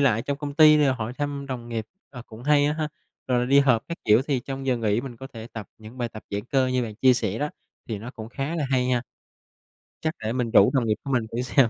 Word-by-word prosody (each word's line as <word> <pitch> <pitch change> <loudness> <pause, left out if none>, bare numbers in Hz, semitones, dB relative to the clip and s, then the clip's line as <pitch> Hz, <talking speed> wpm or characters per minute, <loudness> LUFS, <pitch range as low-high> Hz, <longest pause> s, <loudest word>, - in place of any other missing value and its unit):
lại 120 -5 +3
trong 140 -1 -3
công 145 -1 -5
ty 155 -1 +8
để 145 - +4
hỏi 120 -1 -4
thăm 145 -1 -3
đồng 120 -3 -5
nghiệp, 110 -2 -3 0.2
ờ, 125 -4 -9
cũng 115 +1 -11
hay 145 +1 +4
á 150 - +2
ha, 155 -1 -2 0.4
rồi 125 -1 +2
là - - +1
đi 140 +2 +5
họp 125 -5 +3
các 170 - -4
kiểu 110 +4 +5
thì 135 -4 0
trong 135 +1 -6
giờ 130 - +2
nghỉ 110 -1 +1
mình 120 -2 -8
có 135 - -8
thể 115 -3 -9
tập 110 -3 -6
những 110 +4 -12
bài 120 -1 -1
tập 110 -1 -10
giãn 100 +1 -3
cơ 130 0 +2
như 130 -1 +1
bạn 110 -2 -5
chia 130 +3 +5
sẻ 110 -3 -1
đó, 150 - 0 0.4
thì 110 -3 -3
nó 120 +4 -7
cũng 110 -3 -9
khá 135 +6 -3
là 150 - 0
hay 125 -1 +2
nha, 125 -2 +1 1.0
chắc 160 +1 -1
để 110 +2 -1
mình 125 -3 -1
rủ 100 - +6
đồng 125 -4 +2
nghiệp 105 - +2
của 140 - -4
mình 120 -3 +2
thử 120 - -2
xem. 125 -1 +3
125 Hz, 280 wpm, -25 LUFS, 115-140 Hz, 1.0 s, ty